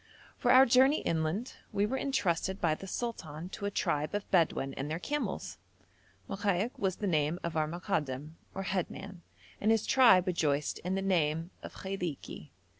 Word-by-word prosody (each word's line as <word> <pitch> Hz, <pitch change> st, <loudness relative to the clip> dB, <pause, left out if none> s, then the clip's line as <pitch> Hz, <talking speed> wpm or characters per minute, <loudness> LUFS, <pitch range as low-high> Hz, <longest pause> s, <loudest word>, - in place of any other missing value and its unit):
For -, -, -1 dB
our 260 Hz, +1 st, +8 dB
journey 265 Hz, +5 st, +5 dB
inland 165 Hz, +9 st, -1 dB
we 200 Hz, -, +1 dB
were 240 Hz, +5 st, -2 dB
entrusted 195 Hz, -9 st, 0 dB
by 165 Hz, -3 st, +2 dB
the 195 Hz, +5 st, -7 dB
sultan 180 Hz, -8 st, -5 dB
to 200 Hz, +1 st, -4 dB
a -, -, 0 dB
tribe 155 Hz, -3 st, -1 dB
of 205 Hz, -, -3 dB
Bedouin 160 Hz, -6 st, +2 dB
and 135 Hz, +2 st, -4 dB
their 160 Hz, -, -2 dB
camels. 295 Hz, +11 st, -3 dB, 0.7 s
Mokaik 200 Hz, +3 st, 0 dB
was 190 Hz, -2 st, 0 dB
the 210 Hz, -, -4 dB
name 155 Hz, -2 st, +1 dB
of 170 Hz, -1 st, -3 dB
our 155 Hz, -1 st, +1 dB
Mokadam 155 Hz, -5 st, -3 dB, 0.2 s
or 195 Hz, -, -3 dB
head 190 Hz, -2 st, -1 dB
man, 195 Hz, -3 st, -9 dB, 0.4 s
and 215 Hz, -, +2 dB
his 225 Hz, -1 st, +3 dB
tribe 230 Hz, -9 st, +6 dB
rejoiced 150 Hz, -5 st, 0 dB
in 180 Hz, +2 st, -2 dB
the 195 Hz, -, -1 dB
name 165 Hz, -2 st, +1 dB
of -, -, -9 dB
Khailiki. 180 Hz, -6 st, -5 dB
185 Hz, 175 wpm, -31 LUFS, 155-205 Hz, 0.7 s, our